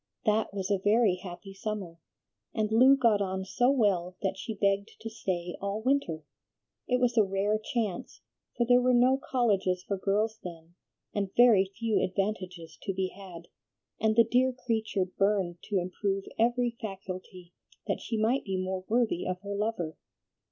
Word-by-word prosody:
That 215 +1 +2
was 195 0 -3
a 200 - +2
very 210 -3 +4
happy 185 +2 -9
summer, 195 -4 -5 0.6
and 215 -1 0
Lu 260 +5 +6
got 230 -6 +3
on 190 -1 -2
so 245 +6 +2
well 195 -9 +1
that 190 -1 0
she 220 +3 -5
begged 200 0 +1
to 225 - -6
stay 180 -5 -3
all 200 +2 -3
winter. 230 - 0 0.6
It 250 0 +2
was 245 -1 +1
a - - +7
rare 200 +2 0
chance, 215 -4 -4 0.3
for 240 - +2
there 245 +1 +5
were 250 0 +3
no 255 +2 +5
colleges 195 -7 +1
for 200 0 -3
girls 215 +3 0
then, 170 -1 -9 0.4
and 200 -2 -1
very 230 -6 +7
few 225 -1 +1
advantages 185 -3 -3
to 195 -3 -3
be 190 0 -1
had, 185 -4 -11 0.5
and 220 0 +2
the 230 - +7
dear 250 +3 +2
creature 220 -6 -1
burned 190 -2 0
to 205 - -1
improve 195 +2 -2 0.2
every 240 +1 +2
faculty, 185 -3 -7 0.3
that - - -2
she 225 - -3
might 230 +5 +1
be 190 -1 -2
more 185 0 -3
worthy 230 -5 +1
of 185 0 -3
her 200 0 -5
lover. 200 -6 -2
200 Hz, 165 wpm, -29 LUFS, 185-225 Hz, 0.6 s, a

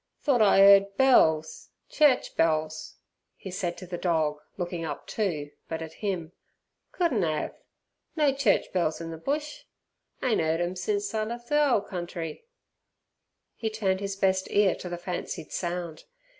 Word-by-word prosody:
"Thort 260 -5 +3
I 200 -2 +5
'eard 200 0 +6
bells 160 -12 +3 0.2
church 295 -4 +3
bells," 155 -1 0 0.4
he 190 - -8
said 180 -1 -3
to 185 - -8
the 175 -1 -6
dog 160 -4 0 0.2
looking 175 -2 -3
up 150 -3 -5
too, 155 -9 -2 0.2
but 160 0 -3
at 160 0 -9
him. 180 -6 -2 0.6
"Couldn't 295 - +1
'ave. 155 -2 -1 0.6
No 295 -4 +3
church 270 -7 +1
bells 170 -4 0
in 165 0 -6
the 165 - -6
bush. 295 - -3 0.6
Ain't 245 -8 +2
'eard 160 +1 0
'em 175 +1 -1
since 205 +4 -2
I 215 -1 0
lef' 235 +2 -6
th' - - -22
ole 295 -7 +4
country." 175 - -6 1.1
He 225 - -2
turned 200 -4 0
his 200 0 -3
best 190 -1 +1
ear 200 -2 +3
to 180 - -7
the 175 - -4
fancied 175 -3 -5
sound. 175 -3 -4
185 Hz, 155 wpm, -27 LUFS, 165-215 Hz, 1.1 s, eard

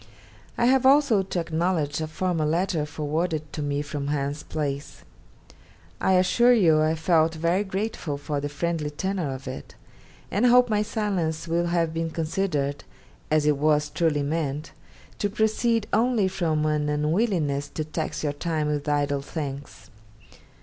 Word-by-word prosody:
I 240 - +2
have 260 +1 +4
also 270 -6 +5
to 190 -1 -3
acknowledge 165 -2 -1
a 155 - -2
former 170 0 -1
letter 165 -1 0
forwarded 155 +1 -2
to 150 - -4
me 145 0 -1
from 145 -1 -4
Hans 145 0 -2
Place. 140 -2 -4 1.0
I 190 - +3
assure 185 +7 +4
you 165 -9 +4
I 155 +1 +2
felt 160 0 +2
very 170 +5 +1
grateful 190 -6 -3
for 145 0 -3
the 145 - -3
friendly 155 +1 -2
tenor 180 0 -2
of 130 0 -7
it, 130 - -7 0.6
and 215 +5 +3
hope 245 -1 +5
my 210 -1 +2
silence 185 -7 -2
will 170 +1 +1
have 170 -2 0
been 165 0 -2
considered, 155 -3 -2 0.5
as 155 -1 +2
it 150 -1 +3
was 150 0 +2
truly 150 -3 +1
meant, 150 0 -2 0.5
to 205 - 0
proceed 220 +1 +1
only 230 -4 +3
from 160 -5 0
an 150 -1 0
unwillingness 150 -2 0
to 155 - -4
tax 155 +1 -4
your 145 -1 0
time 155 0 -2
with 150 0 -2
idle 145 -1 +1
thanks. 140 -1 -7
160 Hz, 155 wpm, -25 LUFS, 150-190 Hz, 1.0 s, also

